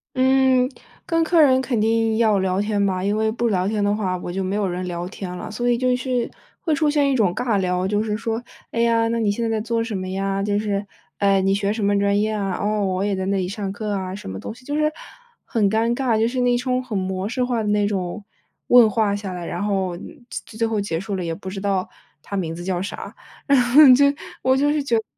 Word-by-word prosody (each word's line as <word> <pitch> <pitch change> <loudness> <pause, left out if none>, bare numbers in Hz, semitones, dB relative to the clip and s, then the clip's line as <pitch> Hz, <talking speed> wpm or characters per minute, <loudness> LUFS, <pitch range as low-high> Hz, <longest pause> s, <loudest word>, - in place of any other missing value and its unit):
嗯， 260 -1 +3 0.4
跟 330 -1 +1
客 325 0 +4
人 260 -3 +5
肯 255 -3 -1
定 225 0 +2
要 215 -3 +3
聊 190 0 0
天 205 -1 0
吧， 185 -1 -1
因 205 +1 +1
为 220 0 +1
不 235 +1 -1
聊 185 -2 +1
天 210 0 0
的 205 0 +2
话， 190 -4 -1
我 175 - -6
就 190 +1 -2
没 190 +2 -2
有 205 -1 0
人 180 0 -3
聊 175 0 -4
天 185 -2 -7
了。 180 - -7
所 240 +3 -1
以 240 - +3
就 250 0 +2
是 250 -1 -1 0.3
会 320 - 0
出 305 0 +2
现 290 -2 +2
一 265 - +1
种 200 -7 +2
尬 230 -5 0
聊， 180 0 0
就 210 +1 +1
是 215 -1 -2
说， 225 +1 -3 0.3
“哎 230 - -3
呀， 230 -1 +3
那 230 - 0
你 220 -2 +1
现 230 +3 -2
在 230 - 0
在 220 -1 0
做 230 +1 -1
什 225 -3 -4
么 185 0 -4
呀？” 195 +1 -1
就 205 0 0
是， 205 -1 -1 0.3
“哎， 195 -1 +3
你 195 +1 +2
学 200 0 0
什 215 -1 -2
么 200 0 +2
专 200 0 +2
业 215 +1 +1
啊？ 200 -3 -2
哦， 210 0 0
我 185 0 -1
也 205 -1 0
在 190 - -3
那 200 - +1
里 185 -1 -1
上 200 0 -4
课 210 +1 -4
啊“， 190 -1 -3
什 190 - -8
么 95 0 -6
东 - - -6
西， 250 +1 -18
就 290 - -3
是 305 0 +2 0.5
很 210 -4 +1
尴 225 +3 +1
尬， 240 -3 +1
就 225 - +3
是 255 +1 -1
那 245 -1 +3
种 255 0 -1
很 225 -5 -4
模 190 +1 -2
式 250 +2 -1
化 245 -2 0
的 210 - -2
那 205 0 +2
种 195 0 -3 0.4
问 240 -3 +7
话 205 -1 +1
下 200 -2 -5
来， 175 -1 -6
然 175 +4 -4
后 190 -3 -1 0.3
最 220 -1 -8
最 230 - +1
后 220 -2 -1
结 165 -5 -2
束 200 +1 -4
了 185 - -3
也 165 -1 -3
不 190 +1 -8
知 195 0 -6
道， 195 -2 0 0.4
他 200 - -6
名 165 -4 -2
字 175 - -7
叫 180 -1 -1
啥， 195 - -6 0.3
然 280 -3 +4
后 245 +5 +6
就 280 +3 +5 0.4
我 260 +1 +3
就 290 +1 +2
是 300 - 0
觉 240 -4 +1
得， 220 - -1
210 Hz, 280 characters per minute, -22 LUFS, 195-235 Hz, 0.5 s, 问